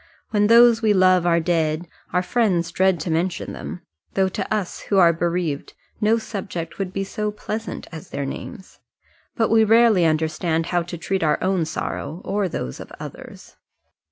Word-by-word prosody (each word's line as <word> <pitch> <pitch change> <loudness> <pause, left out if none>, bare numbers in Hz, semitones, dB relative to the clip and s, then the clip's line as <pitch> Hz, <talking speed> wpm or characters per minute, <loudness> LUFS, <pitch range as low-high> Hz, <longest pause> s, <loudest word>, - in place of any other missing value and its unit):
When 210 -1 +3
those 235 0 +6
we 215 -2 +3
love 185 -2 +4
are 170 -1 +4
dead, 165 -1 0 0.2
our 180 0 +1
friends 180 -6 +1
dread 190 0 +2
to 165 - -3
mention 170 +3 -1
them, - - -7 0.3
though 190 -1 +2
to - - -5
us 210 -4 -2
who 200 - +2
are 170 -3 +6
bereaved 170 -3 -2 0.3
no 220 +2 +4
subject 195 -7 -6
would 190 -2 -2
be 195 +1 -2
so 210 +2 -3
pleasant 215 +1 -5
as 160 -2 -9
their 140 - -3
names. 190 - -8 0.6
But 225 -2 +1
we 225 0 +6
rarely 220 -4 +5
understand 160 +1 0
how 175 - +3
to 175 0 -6
treat 190 +4 -2
our 150 -2 +2
own 185 -3 +1
sorrow 160 +1 -4
or 195 -1 0
those 65 - -5
of - - -10
others. - - -10
185 Hz, 175 wpm, -22 LUFS, 165-210 Hz, 0.6 s, those